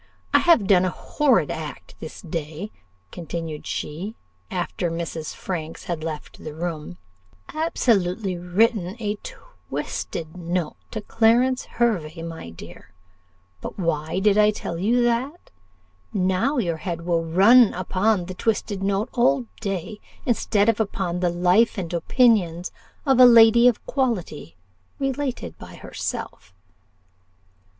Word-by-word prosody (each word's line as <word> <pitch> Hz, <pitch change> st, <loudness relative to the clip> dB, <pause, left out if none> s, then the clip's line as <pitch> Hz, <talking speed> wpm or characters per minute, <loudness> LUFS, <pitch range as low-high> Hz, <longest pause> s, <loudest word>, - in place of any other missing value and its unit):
I -, -, +7 dB
have 335 Hz, -, +4 dB
done 185 Hz, -2 st, +5 dB
a 185 Hz, -, +1 dB
horrid 255 Hz, -, +1 dB
act 155 Hz, -2 st, -7 dB
this 160 Hz, -, -9 dB
day," 165 Hz, +3 st, -5 dB, 0.4 s
continued 165 Hz, -2 st, -6 dB
she, 180 Hz, +9 st, -4 dB, 0.3 s
after 175 Hz, -1 st, -2 dB
Mrs. 165 Hz, -1 st, -5 dB
Franks 165 Hz, -4 st, -5 dB
had 170 Hz, -3 st, -4 dB
left 155 Hz, -2 st, -7 dB
the 155 Hz, -1 st, -7 dB
room 160 Hz, -, -5 dB, 0.6 s
"absolutely 205 Hz, -, +1 dB
written 185 Hz, +2 st, +1 dB
a 210 Hz, -2 st, -2 dB
twisted 165 Hz, -, -6 dB
note 175 Hz, -2 st, -2 dB
to 215 Hz, -, -5 dB
Clarence 240 Hz, +4 st, +2 dB
Hervey, 175 Hz, -9 st, -1 dB
my 165 Hz, -, -7 dB
dear 85 Hz, +2 st, -13 dB, 0.7 s
but -, -, -7 dB
why 160 Hz, -3 st, -1 dB
did 205 Hz, +1 st, +3 dB
I 210 Hz, 0 st, +6 dB
tell 170 Hz, -5 st, -4 dB
you 235 Hz, +6 st, +2 dB
that? 250 Hz, +8 st, -1 dB, 0.6 s
Now 190 Hz, +9 st, +1 dB
your 170 Hz, -9 st, 0 dB
head 170 Hz, 0 st, -5 dB
will 170 Hz, -1 st, +1 dB
run 200 Hz, +8 st, +6 dB
upon 185 Hz, +1 st, +1 dB
the 185 Hz, -, -6 dB
twisted 205 Hz, 0 st, -1 dB
note 200 Hz, +3 st, 0 dB
all 140 Hz, -, +2 dB
day, 195 Hz, +2 st, -4 dB, 0.3 s
instead 215 Hz, -4 st, +2 dB
of 230 Hz, -2 st, +2 dB
upon 190 Hz, -4 st, -2 dB
'The 180 Hz, -1 st, +1 dB
Life 180 Hz, +7 st, +3 dB
and 180 Hz, -3 st, -4 dB
Opinions 180 Hz, -2 st, +2 dB, 0.3 s
of 265 Hz, -3 st, +3 dB
a 255 Hz, -, +10 dB
Lady 235 Hz, 0 st, +7 dB
of 245 Hz, -, +1 dB
Quality, 200 Hz, -, -2 dB, 0.4 s
related 270 Hz, -, -3 dB
by -, -, -11 dB
herself. 95 Hz, -, -6 dB
185 Hz, 130 wpm, -23 LUFS, 165-230 Hz, 0.7 s, a